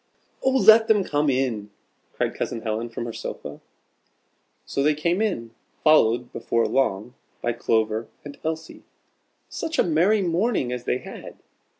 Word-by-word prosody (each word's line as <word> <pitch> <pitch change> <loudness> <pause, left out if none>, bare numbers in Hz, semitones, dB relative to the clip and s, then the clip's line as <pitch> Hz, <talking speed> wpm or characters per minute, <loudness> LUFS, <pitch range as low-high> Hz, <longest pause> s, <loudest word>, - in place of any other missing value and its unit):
"Oh, 265 - +2
let 220 0 +7
them 210 -3 +4
come 150 -3 0
in!" 125 -6 -1 0.4
cried - - -1
Cousin 115 - -4
Helen 110 +1 -3
from 115 0 -5
her 115 - -5
sofa. - - -7 1.0
So 140 - -2
they 150 +2 +3
came 170 +6 0
in, 115 - -2 0.3
followed, 125 -6 +4
before 115 0 0
long, 120 -3 0 0.3
by 120 - +1
Clover 110 -1 0 0.2
and 145 -1 -8
Elsie. 160 0 -5 0.7
Such 325 -1 -4
a - - +5
merry 185 +6 +2
morning 175 - 0
as 125 -1 -5
they - - +1
had! - - -10
135 Hz, 145 wpm, -24 LUFS, 115-175 Hz, 1.0 s, let